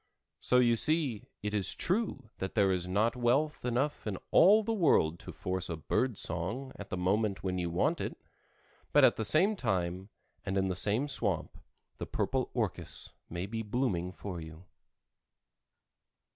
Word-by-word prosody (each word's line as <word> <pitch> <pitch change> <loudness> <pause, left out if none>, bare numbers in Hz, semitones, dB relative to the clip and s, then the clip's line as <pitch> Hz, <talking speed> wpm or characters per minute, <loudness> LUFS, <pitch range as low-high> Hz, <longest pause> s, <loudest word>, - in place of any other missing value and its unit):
So 125 - +2
you 120 -2 +4
see 150 -7 0 0.2
it 105 0 -2
is 100 -3 +2
true 175 - -2
that 95 - -4
there 100 -3 +4
is 90 -1 -1
not 105 +6 +1
wealth 130 +5 +1
enough 125 +2 -1
in 100 -3 -2
all 210 +5 +6
the 225 +2 -1
world 110 - +3
to - - -8
force 95 0 -3
a 85 - -3
bird 120 +8 -1
song 115 +11 +1
at 105 - -9
the 95 - -3
moment 100 +3 0
when 90 -1 -1
you 85 -1 -2
want 85 - 0
it, - - -4 0.8
but - - +6
at - - +6
the 110 - -2
same 190 - +3
time 95 - -2 0.3
and 95 - -2
in 95 0 +1
the 90 - -2
same 105 +9 +1
swamp 105 - 0 0.4
the - - -5
purple - - -1
orchis - - -3 0.2
may 85 +2 -4
be 110 +3 -4
blooming 105 -6 -1
for 90 -2 -7
you. 80 +2 -11
105 Hz, 170 wpm, -31 LUFS, 90-130 Hz, 0.8 s, all